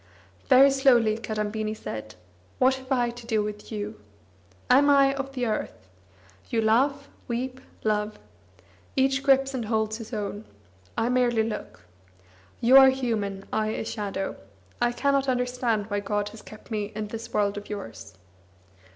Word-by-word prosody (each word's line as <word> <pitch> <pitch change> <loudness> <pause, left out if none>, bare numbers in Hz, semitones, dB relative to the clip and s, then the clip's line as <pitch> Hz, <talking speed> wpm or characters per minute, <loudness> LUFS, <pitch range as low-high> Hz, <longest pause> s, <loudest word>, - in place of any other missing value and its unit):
Very 270 +2 +7
slowly 245 -5 +4
Kadambini 215 -1 -3
said: 110 - -7 0.4
"What 260 +1 +4
have 260 0 -9
I 245 -2 +2
to 240 -1 -12
do 220 -3 +1
with 210 +1 -7
you? 210 0 -5 0.7
Am 280 +3 +5
I 275 -1 +5
of 270 0 -5
the 250 -2 -1
earth? 215 - -4 0.6
You 230 - 0
laugh, 270 +6 +2 0.2
weep, 255 +2 -3 0.2
love; 210 0 0 0.8
each 265 -1 +2
grips 270 -1 +3
and 245 -4 -3
holds 220 0 0
his 225 0 -9
own; 210 -1 -4 0.5
I 235 - +1
merely 245 -3 +2
look. 220 -1 -6 0.8
You 250 +3 +7
are 265 0 +9
human, 215 -7 -2
I 215 0 +1
a 215 - -3
shadow. 200 -3 -4 0.4
I 240 0 +3
cannot 275 +1 +1
understand 250 -4 0
why 205 - +1
God 205 0 -2
has 215 +1 -12
kept 215 +2 -14
me 210 -2 -1
in 215 -1 -4
this 225 +1 -7
world 205 -1 +1
of 205 0 -8
yours." 200 - -8
230 Hz, 150 wpm, -26 LUFS, 210-260 Hz, 0.8 s, are